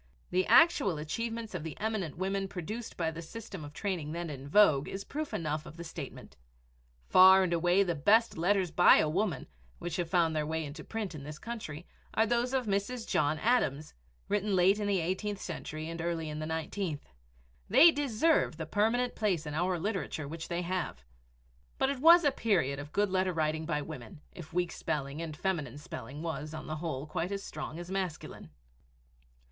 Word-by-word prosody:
The 185 +1 +1
actual 290 - +5
achievements 225 +8 -4
of 180 - -3
the 160 -2 -7
eminent 210 -8 -2
women 195 +1 -1
produced 210 +6 -6
by 165 -2 0
the 165 +1 -7
system 195 -1 -8
of 145 - -8
training 160 -3 -3
then 170 -1 -4
in 135 -1 -8
vogue 155 -7 +5
is 195 +1 -5
proof 305 +6 -5
enough 155 -1 -3
of 160 - -11
the 170 - -6
statement. 160 -4 -9 0.7
Far 190 +1 +8
and 175 -2 0
away 175 +3 +3
the 175 -3 -1
best 215 +10 +3
letters 180 +1 +1
by 175 +2 +7
a - - +3
woman, 175 -3 -1 0.3
which 175 0 -4
have 175 -2 -2
found 165 -3 +2
their 155 - +1
way 160 0 -2
into 150 +2 -8
print 220 -5 -4
in 150 - -7
this 150 +2 -8
country, 180 -9 -7 0.3
are 220 - +4
those 240 +2 +1
of 260 -2 0
Mrs. 210 +4 -2
John 150 +1 +1
Adams, 155 - +1 0.3
written 205 -1 0
late 190 +3 +4
in 205 - -1
the 200 -2 +2
eighteenth 190 +4 -2
century 155 -4 -6
and 165 0 -5
early 165 -2 -2
in 150 0 -5
the 155 - -3
nineteenth. 160 0 -3 0.6
They 280 - +8
deserve 290 - +1
the 160 - -4
permanent 225 +8 +1
place 190 -7 0
in 150 - -5
our 175 +3 0
literature 170 -5 -3
which 160 +2 -6
they 175 +1 -2
have. 175 - -3 0.7
But 265 - +2
it 275 - -4
was 335 +4 +8
a 290 - +4
period 175 - +1
of 145 +1 -8
good 205 +1 +1
letter 185 -1 +1
writing 155 0 -1
by 150 -3 -1
women 140 -3 -9
if 165 -3 -11
weak 175 0 0
spelling 140 +1 -3
and 155 -2 -6
feminine 150 -9 -2
spelling 145 0 -8
was, 160 -2 -4
on 155 - -7
the 155 - -4
whole, 150 -4 -4
quite 165 +4 -3
as 200 0 -3
strong 155 +1 -6
as 175 +1 -7
masculine! 185 - -4
175 Hz, 195 wpm, -31 LUFS, 155-205 Hz, 0.7 s, Far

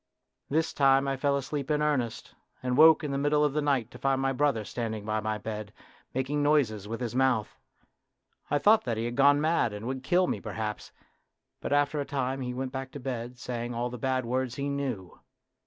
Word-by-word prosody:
This 160 +2 +1
time 135 -1 +4
I 135 - 0
fell 140 +1 +1
asleep 140 +1 -4
in 150 -1 +2
earnest, 140 -7 -1 0.3
and 125 -1 0
woke 155 +2 +7
in 150 - -2
the 140 - -1
middle 150 +1 +2
of 145 - 0
the 150 - +1
night 135 -5 0
to - - -12
find 135 -1 +1
my 135 0 +1
brother 135 -5 +1
standing 110 -3 -4
by 110 0 0
my 110 0 -2
bed, 105 -1 -6 0.4
making 135 +3 -1
noises 130 -9 +2
with 115 +3 -5
his 120 -2 -3
mouth. 130 -4 +1 0.9
I 145 - +2
thought 215 +7 +5
that 115 -2 -1
he 115 - -1
had 120 0 -3
gone 140 +2 +5
mad, 155 -7 +1
and 105 +2 -6
would 130 +1 -3
kill 180 +7 +3
me 105 - -2
perhaps, 110 -1 -5 0.7
but - - -5
after 145 +1 +2
a - - -3
time 135 -1 -2
he 125 -1 -3
went 130 +1 -4
back 135 0 -5
to 145 - -6
bed 125 -2 -5
saying 120 -1 -4
all 120 +1 -2
the 125 - -7
bad 130 0 0
words 125 +1 -1
he 140 0 -2
knew. 130 -10 -4
130 Hz, 215 wpm, -28 LUFS, 120-145 Hz, 0.9 s, woke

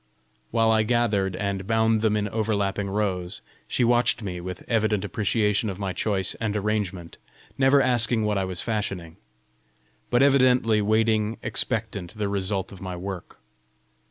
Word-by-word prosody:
While 115 -1 +3
I 110 0 +4
gathered, 105 -5 +1
and 100 -2 -3
bound 110 -1 +2
them 110 -1 +2
in 105 0 -1
overlapping 100 -2 -1
rows, 95 -3 -2 0.3
she 125 - +1
watched 120 -1 +3
me 90 -3 -4
with 90 +1 -7
evident 110 -3 +1
appreciation 105 +2 0
of 95 - -5
my 95 -2 -3
choice 95 -3 -1
and 105 -2 -1
arrangement, 100 -5 -2 0.4
never 135 +1 +4
asking 120 -2 +2
what 105 -2 +1
I 95 - 0
was 90 -2 -3
fashioning, 100 -7 -3 0.9
but 120 +2 +4
evidently 125 -5 +4
waiting 110 +1 +1
expectant 110 -4 -2
the 105 -1 -1
result 95 -1 -2
of 95 - -12
my 95 -1 -5
work. 95 0 -7
105 Hz, 150 wpm, -25 LUFS, 95-115 Hz, 0.9 s, I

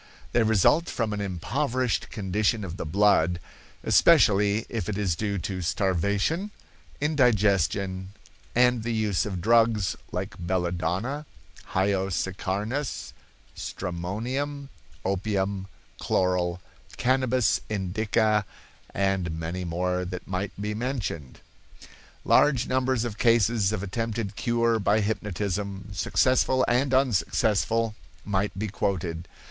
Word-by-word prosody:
They 120 - +3
result 110 - +3
from 115 -3 -1
an 105 - -3
impoverished 125 - -1
condition 105 +2 0
of 90 -1 -6
the 85 - -4
blood, 90 -2 +3 0.4
especially 105 +1 +4
if 110 -2 -3
it 100 - -2
is 95 -5 0
due 100 +2 -2
to 95 +1 -4
starvation, 100 - 0 0.5
indigestion, 100 - +2 0.5
and 125 -1 +4
the 115 +1 -2
use 105 -4 0
of 95 -4 -4
drugs 115 -2 +3 0.2
like - - -3
belladonna, 90 - -2 0.5
hyoscyarnus, 95 +6 -1 0.4
stramonium, 120 +11 -4 0.4
opium, 95 0 -1 0.3
chloral, 90 -1 0 0.4
cannabis 130 -2 +2
indica, 105 +2 +1 0.5
and 95 -2 +1
many 85 +3 -4
more 90 +1 -1
that 90 0 -6
might 95 +1 -4
be 105 +1 -2
mentioned." 110 - -4 0.8
Large 130 -4 +4
numbers 130 -2 +1
of 110 -3 -5
cases 115 -3 +3
of 105 -3 -3
attempted 110 0 -3
cure 115 -1 +1
by 105 +2 +2
hypnotism, 100 -1 -3
successful 130 +5 +2
and 130 +3 +2
unsuccessful, 115 - +2 0.3
might 100 -1 -1
be 110 +2 -2
quoted. 90 -4 -2
105 Hz, 105 wpm, -26 LUFS, 95-115 Hz, 0.8 s, especially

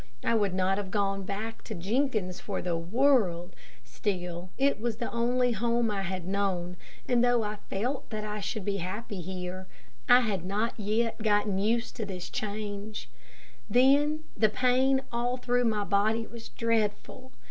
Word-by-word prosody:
I - - +2
would 205 -4 +2
not 190 +1 +2
have 200 -2 -4
gone 195 -1 0
back 215 +4 -5
to 220 - -5
Jenkins' 205 -1 0
for 200 - -3
the 175 -1 -1
world, 180 -2 +2 0.3
still 175 - -3
it 275 -5 +2
was 235 -1 -1
the 235 +1 -4
only 245 +1 +2
home 235 0 +1
I 200 -1 -1
had 185 -2 -3
known, 185 -2 -1 0.3
and 245 -1 +3
though 245 -2 +4
I 210 0 -3
felt 245 +8 -2
that 215 -2 -4
I 210 0 -3
should 210 0 -3
be 200 -1 0
happy 195 +2 -4
here, 185 +1 -5 0.4
I 245 +1 +8
had 205 -7 -1
not 210 +5 -1
yet 220 +2 0
gotten 205 -2 +2
used 230 +4 0
to 220 - -2
the 185 -2 -5
change. 210 0 -5 0.6
Then 285 +5 +4
the 215 - +4
pain 260 +4 +3
all 245 +1 0
through 245 0 +1
my 215 -2 +1
body 215 +3 +2
was 230 -1 -10
dreadful. 230 +3 -1
210 Hz, 165 wpm, -29 LUFS, 195-235 Hz, 0.6 s, I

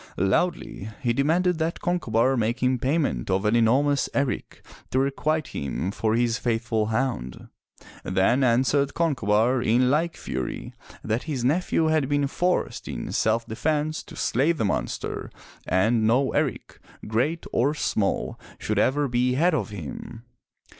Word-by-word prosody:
Loudly 100 - 0
he 120 -2 +2
demanded 165 +6 +1
that 160 +1 -1
Concobar 135 -8 +1
make 120 +1 -1
him 125 0 +2
payment 135 - 0
of 95 +2 +1
an 105 +2 +3
enormous 135 +5 +3
erici 140 -2 -2 0.3
to - - -1
requite 140 +3 0
him 70 +7 -3
for 110 +1 0
his 115 -1 +1
faithful 115 -2 0
hound. 110 - -2 0.5
Then 95 +8 +2
answered 130 +3 +2
Con 165 -2 +2
cobar 115 +2 +2
in 125 +2 +3
like 165 +3 0
fury 65 - -5 0.3
that 110 +3 -1
his 130 -5 -2
nephew 160 +2 +2
had 155 -4 +1
been 145 0 +2
forced 180 +6 -1
in - - -5
self 115 +1 +1
defense 155 +6 -1
to - - -12
slay 135 +8 +1
the 140 -10 -1
monster, 100 - -3 0.4
and 110 +4 +2
no 130 +4 +3
eric, - - -2 0.3
great 130 +10 -1
or 140 +5 +2
small, 105 -8 -1 0.2
should 105 -1 -1
ever 145 +6 +2
be 125 0 +1
had 170 +6 +3
of 120 -11 -1
him. 100 +4 -8
125 Hz, 145 wpm, -25 LUFS, 110-145 Hz, 0.5 s, an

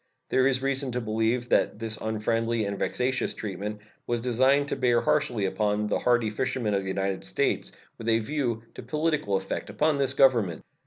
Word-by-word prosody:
There 130 0 +3
is 130 -1 +1
reason 135 -1 0
to 125 - 0
believe 115 +2 0
that - - +2
this 110 -1 -3
unfriendly 115 +1 -1
and 100 -1 -3
vexatious 130 +1 0
treatment 105 0 -5 0.3
was 120 -1 0
designed 130 +4 +2
to - - -1
bear 120 -2 +3
harshly 125 -9 +1
upon 105 +2 0
the - - 0
hardy 120 -3 +2
fishermen 125 -1 -1
of 100 - +1
the 95 - -7
United 95 0 -2
States, - - -1 0.3
with 115 0 -2
a 115 - +4
view 120 -2 -2
to - - -8
political 150 -9 0
effect 95 - -4
upon 150 -1 +1
this 135 0 0
Government. 115 -12 +3
115 Hz, 180 wpm, -27 LUFS, 105-130 Hz, 0.3 s, a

